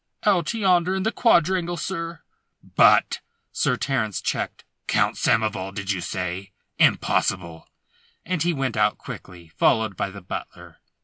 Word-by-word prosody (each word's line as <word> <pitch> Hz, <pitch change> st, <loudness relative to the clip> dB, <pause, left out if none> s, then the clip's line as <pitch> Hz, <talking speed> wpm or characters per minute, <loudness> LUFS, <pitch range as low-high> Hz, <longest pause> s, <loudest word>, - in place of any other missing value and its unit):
"Out 185 Hz, -6 st, +2 dB
yonder, 185 Hz, -3 st, +2 dB
in 190 Hz, -, -1 dB
the 220 Hz, -, +1 dB
quadrangle, 175 Hz, -6 st, +2 dB
sir." 165 Hz, -1 st, -5 dB, 0.5 s
"But -, -, +5 dB, 0.2 s
" -, -, -47 dB
Sir -, -, +1 dB
Terence 120 Hz, -7 st, -1 dB
checked. -, -, -3 dB, 0.2 s
"Count -, -, +2 dB
Samoval, 105 Hz, -3 st, 0 dB
did 100 Hz, -1 st, -2 dB
ye 95 Hz, -, -1 dB
say? 95 Hz, +2 st, -4 dB, 0.3 s
Impossible!" 85 Hz, -3 st, +1 dB, 0.6 s
and 180 Hz, -2 st, -2 dB
he 175 Hz, -, +2 dB
went 135 Hz, -6 st, -2 dB
out 105 Hz, -1 st, +2 dB
quickly, 85 Hz, -3 st, -10 dB
followed 110 Hz, +4 st, +2 dB
by 100 Hz, -, -2 dB
the 100 Hz, +1 st, -10 dB
butler. 90 Hz, -, -8 dB
110 Hz, 140 wpm, -24 LUFS, -, 0.6 s, But